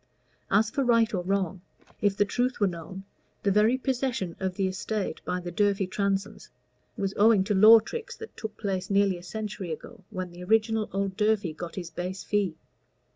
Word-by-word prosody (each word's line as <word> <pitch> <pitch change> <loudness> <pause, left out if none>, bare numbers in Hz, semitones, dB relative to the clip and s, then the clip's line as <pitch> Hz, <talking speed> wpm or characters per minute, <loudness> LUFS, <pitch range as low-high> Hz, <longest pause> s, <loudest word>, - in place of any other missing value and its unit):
As 220 0 +3
for 275 - 0
right 230 -2 +3
or 185 - 0
wrong, 190 -1 -1 0.4
if 205 -1 +2
the 205 - +4
truth 245 +5 -1
were 205 - +4
known, 185 +1 -5 0.4
the 200 - +3
very 215 +5 +4
possession 250 -9 -2
of 190 -1 -2
the 195 - 0
estate 190 0 -3
by 180 - -1
the 175 -1 -6
Durfey 200 +1 +2
Transomes 195 +1 -2 0.5
was 195 0 -1
owing 210 -2 +5
to 205 - 0
law 215 +4 +9
tricks 465 - -7
that 450 - -10
took 220 -1 -7
place 195 -3 -3
nearly 195 -2 +2
a - - -13
century 205 -2 -5
ago, 160 +4 -8
when 185 -4 -5
the 175 +1 -10
original 220 +2 +2
old 195 -1 -2
Durfey 210 -5 +1
got 170 +1 -7
his 175 -3 -6
base 180 +3 -5
fee. 200 -6 0
200 Hz, 185 wpm, -27 LUFS, 185-220 Hz, 0.5 s, law